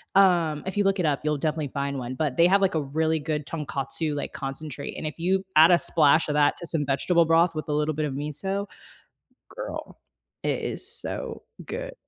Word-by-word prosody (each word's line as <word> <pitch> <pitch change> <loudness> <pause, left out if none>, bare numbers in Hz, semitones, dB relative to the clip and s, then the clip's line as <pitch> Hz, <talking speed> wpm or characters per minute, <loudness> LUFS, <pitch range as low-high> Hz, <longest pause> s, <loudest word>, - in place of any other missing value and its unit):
Um, 170 -6 +4
if 190 +2 -4
you 205 - +3
look 195 0 +2
it 175 - +1
up, 145 -2 +1
you'll 150 -1 0
definitely 155 0 -1
find 140 0 -3
one, 125 +1 -5
but 145 -3 -2
they 170 - +6
have 195 +2 +4
like 190 -3 +2
a 160 - +1
really 160 +3 0
good 150 -1 -3
Tonkatsu 150 0 -2
like 145 - -4
concentrate, 140 +1 -5
and 155 - -4
if 155 - -6
you 190 +3 +1
add 160 +3 +8
a 175 - +6
splash 155 -1 +4
of 150 - -1
that 145 -1 +3
to 170 - -6
some 155 -3 +2
vegetable 165 +5 +2
broth 165 +1 +3
with 155 +1 -5
a - - 0
little 150 +1 0
bit 155 +1 -1
of 140 - -3
miso, 175 +8 -2 0.8
girl, - - -7 0.4
it - - -1
is - - -4
so - - -5 0.2
good. - - -5
155 Hz, 215 wpm, -25 LUFS, 145-175 Hz, 0.8 s, add